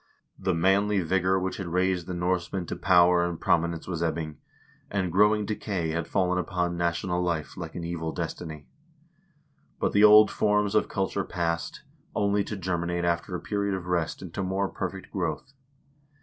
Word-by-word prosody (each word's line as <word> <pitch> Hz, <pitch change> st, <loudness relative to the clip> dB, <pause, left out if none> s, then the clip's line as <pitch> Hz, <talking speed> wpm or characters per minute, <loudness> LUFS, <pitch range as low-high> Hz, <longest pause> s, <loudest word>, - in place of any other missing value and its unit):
The 95 Hz, -2 st, 0 dB
manly 100 Hz, +3 st, +3 dB
vigor 95 Hz, +2 st, +1 dB
which 95 Hz, 0 st, -3 dB
had 95 Hz, -, -5 dB
raised 90 Hz, 0 st, 0 dB
the 90 Hz, -, -4 dB
Norsemen 90 Hz, 0 st, -1 dB
to -, -, -4 dB
power 90 Hz, -1 st, +4 dB
and 85 Hz, -2 st, -3 dB
prom 85 Hz, -, +3 dB
inence 85 Hz, -1 st, -4 dB
was 85 Hz, -3 st, -3 dB
ebbing, 80 Hz, -2 st, -2 dB, 0.5 s
and 95 Hz, -3 st, -1 dB
growing 105 Hz, +3 st, +4 dB
decay 100 Hz, -5 st, -2 dB
had 85 Hz, +1 st, -2 dB
fallen 90 Hz, -2 st, +1 dB
upon 90 Hz, -1 st, -1 dB
national 85 Hz, +1 st, -1 dB
life 85 Hz, -3 st, -2 dB
like 80 Hz, -2 st, -7 dB
an 85 Hz, -, -4 dB
evil 85 Hz, -1 st, -3 dB
destiny. 80 Hz, -4 st, -5 dB, 1.1 s
But -, -, +1 dB
the 105 Hz, -, +4 dB
old 105 Hz, 0 st, +8 dB
forms 105 Hz, -1 st, +1 dB
of 105 Hz, -, +2 dB
culture 95 Hz, 0 st, -1 dB
passed, 85 Hz, -3 st, -3 dB, 0.3 s
only 100 Hz, 0 st, +2 dB
to 105 Hz, -, -5 dB
germinate 85 Hz, -1 st, -1 dB
after 85 Hz, +2 st, -1 dB
a -, -, -3 dB
period 100 Hz, -1 st, -1 dB
of 95 Hz, -2 st, -6 dB
rest 90 Hz, -1 st, -1 dB
into 95 Hz, +2 st, -5 dB
more 95 Hz, +1 st, -1 dB
perfect 95 Hz, 0 st, -5 dB
growth. 90 Hz, -, -3 dB
90 Hz, 170 wpm, -27 LUFS, 85-95 Hz, 1.1 s, old